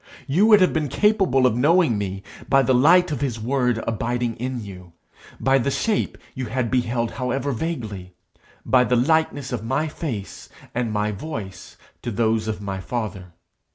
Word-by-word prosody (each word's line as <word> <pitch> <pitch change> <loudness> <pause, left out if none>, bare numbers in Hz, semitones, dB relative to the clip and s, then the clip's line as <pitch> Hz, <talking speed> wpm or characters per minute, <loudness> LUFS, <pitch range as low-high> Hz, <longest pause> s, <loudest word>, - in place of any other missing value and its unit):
You 180 +10 +3
would 210 -3 +7
have 185 - +4
been 155 -2 0
capable 195 - +3
of 125 - +3
knowing 155 +1 +3
me 95 -1 -4 0.3
by 135 0 +5
the 130 +1 +2
light 170 +7 +5
of 145 -3 -3
his 125 -5 -2
word 125 -1 0
abiding 120 +1 -1
in 125 +1 -3
you; 90 -3 -11 0.5
by 135 0 +3
the 135 - 0
shape 210 +9 -1 0.2
you 130 -3 -4
had 115 +1 -2
beheld 120 -2 0
however 135 +2 -2
vaguely; 110 - -5 0.5
by 130 -1 +4
the 125 - +1
likeness 145 +1 +1
of 120 -4 -3
my 135 +7 0
face 125 - -6 0.2
and 120 -2 -1
my 105 0 0
voice 105 -4 -7 0.2
to 120 - -4
those 110 0 0
of 105 -2 -3
my 100 -1 -4
father. 100 -5 -5
125 Hz, 170 wpm, -23 LUFS, 110-140 Hz, 0.5 s, would